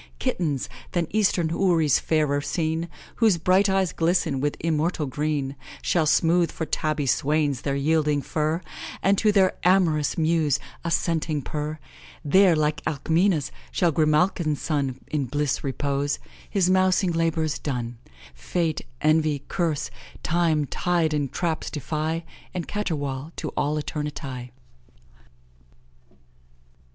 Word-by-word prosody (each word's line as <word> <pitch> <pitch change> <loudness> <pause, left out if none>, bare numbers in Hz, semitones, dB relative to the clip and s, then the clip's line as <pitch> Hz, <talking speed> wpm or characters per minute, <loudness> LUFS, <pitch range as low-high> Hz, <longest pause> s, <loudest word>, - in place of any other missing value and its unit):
Kittens, 145 - -1 0.3
than 175 -1 +1
eastern 190 -6 +2
houris 165 -5 +3
fairer 150 -3 +1
seen, 160 +2 -1 0.3
Whose 220 -6 +4
bright 185 +4 +3
eyes 190 -2 +1
glisten 165 -5 +1
with 145 +2 -1
immortal 160 0 0
green, 145 0 -2 0.3
Shall 160 -3 +2
smooth 170 +2 +3
for 160 - -4
tabby 155 -2 -1
swains 145 0 +1
their 140 -1 -1
yielding 150 0 +1
fur, 155 +2 -1 0.4
And, 195 +2 +4
to 215 - +4
their 190 -2 +4
amorous 175 -5 +3
mews, 160 -3 +2 0.3
assenting 165 -3 0
purr; 150 +2 -4 0.5
There, 185 +3 +5
like 155 +1 0
Alcmena's, 160 +1 +1 0.2
shall 175 -2 +2
Grimalkin's 155 0 +2
son 140 -5 -1
In 150 -3 0
bliss 145 +2 -1
repose, 140 +1 -1 0.3
his 190 -3 +2
mousing 185 0 +3
labours 165 -2 0
done, 120 -4 -4 0.3
Fate, 160 - -2 0.2
envy, 155 -2 +2
curs, 165 -5 -1 0.3
time, 160 -3 +2
tide, 165 +2 0
and 145 -3 -1
traps 165 -3 -2
defy, 155 +3 -2 0.3
And 175 - -3
caterwaul 150 -7 -3
to - - -4
all 150 +2 -1
eternity." 140 -4 -5
155 Hz, 120 wpm, -25 LUFS, 145-170 Hz, 0.5 s, There